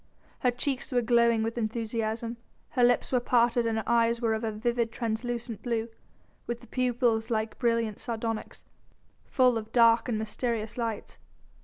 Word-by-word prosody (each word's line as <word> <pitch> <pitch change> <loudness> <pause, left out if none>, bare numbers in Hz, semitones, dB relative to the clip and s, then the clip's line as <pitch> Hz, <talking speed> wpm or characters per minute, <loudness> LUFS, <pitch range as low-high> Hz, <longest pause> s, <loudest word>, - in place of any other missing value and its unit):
Her 250 - +3
cheeks 260 +2 -2
were 245 -1 +2
glowing 235 -1 +3
with 230 +2 -2
enthusiasm, 225 +1 -2 0.3
her 250 - +1
lips 245 0 +3
were 250 - +3
parted 240 -1 +2
and 225 -1 0
her 220 - -1
eyes 235 0 +3
were 230 -2 +1
of 220 +1 -2
a 225 - -1
vivid, 235 +1 -1
translucent 235 0 -3
blue, 230 -2 -2 0.6
with 235 0 -3
the 240 - -15
pupils 240 -3 0
like 220 -1 -2
brilliant 230 -3 0
sardonyx, 225 -1 -4 0.6
full 250 -3 +3
of 220 0 -10
dark 230 0 +5
and 225 - 0
mysterious 220 0 -3
lights. 230 -3 -4
230 Hz, 160 wpm, -28 LUFS, 225-240 Hz, 0.6 s, dark